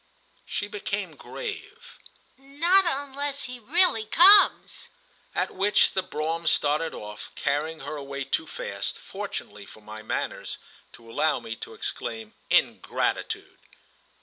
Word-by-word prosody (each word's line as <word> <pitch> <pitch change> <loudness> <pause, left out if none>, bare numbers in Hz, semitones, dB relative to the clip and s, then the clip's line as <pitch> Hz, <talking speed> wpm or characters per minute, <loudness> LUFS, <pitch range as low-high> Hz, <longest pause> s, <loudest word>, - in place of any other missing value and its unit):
She - - -2
became 415 -3 -4
grave. 435 -3 -8 0.4
"Not 330 +8 +3
unless 280 -1 -3
he 250 -1 -7
really 285 - +2
comes!" 385 - +6 0.5
At - - 0
which 205 +2 +3
the 190 - 0
brougham 165 -1 -3
started 155 +2 +2
off, 105 0 -8
carrying 150 +3 -1
her 155 - -5
away 140 0 -5
too - - -1
fast, - - -4
fortunately - - -6
for 110 - -13
my 110 +1 -9
manners, 110 - -3 0.4
to 115 - -15
allow 155 +6 +2
me 115 - -6
to - - -8
exclaim 110 -2 -4 0.2
"Ingratitude!" - - 0
185 Hz, 120 wpm, -26 LUFS, -, 0.5 s, comes